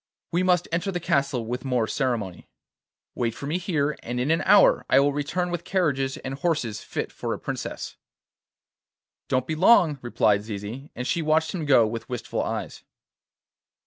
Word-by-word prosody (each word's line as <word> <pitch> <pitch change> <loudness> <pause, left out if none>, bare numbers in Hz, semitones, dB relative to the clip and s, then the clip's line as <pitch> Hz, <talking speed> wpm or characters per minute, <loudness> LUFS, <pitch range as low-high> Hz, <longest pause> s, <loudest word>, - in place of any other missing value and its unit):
We 175 - +1
must 180 -2 +2
enter 175 +4 -1
the 175 - -2
castle 140 -7 0
with 125 +3 -4
more 125 -4 +1
ceremony. 110 -8 -2 0.6
Wait 115 -2 -2
for - - -7
me 160 +5 -1
here, 150 -5 0
and 125 +1 -4
in 130 +5 +1
an 165 - +2
hour 205 -2 +6
I - - +6
will 140 +1 +3
return 175 +5 -2
with 175 -1 -3
carriages 145 -8 0
and 130 -3 -6
horses 135 -8 -1
fit - - -4
for - - -3
a - - -10
princess.' - - -5 1.3
'Don't 130 0 +1
be 160 - -3
long,' 165 -4 +5
replied 105 -4 +2
Zizi, 110 +6 -7
and 125 - -4
she 170 +5 0
watched 155 +1 +1
him 170 -5 -3
go 130 -5 +6
with 115 +3 -5
wistful 125 -2 -3
eyes. - - -4
140 Hz, 175 wpm, -25 LUFS, 125-165 Hz, 1.3 s, hour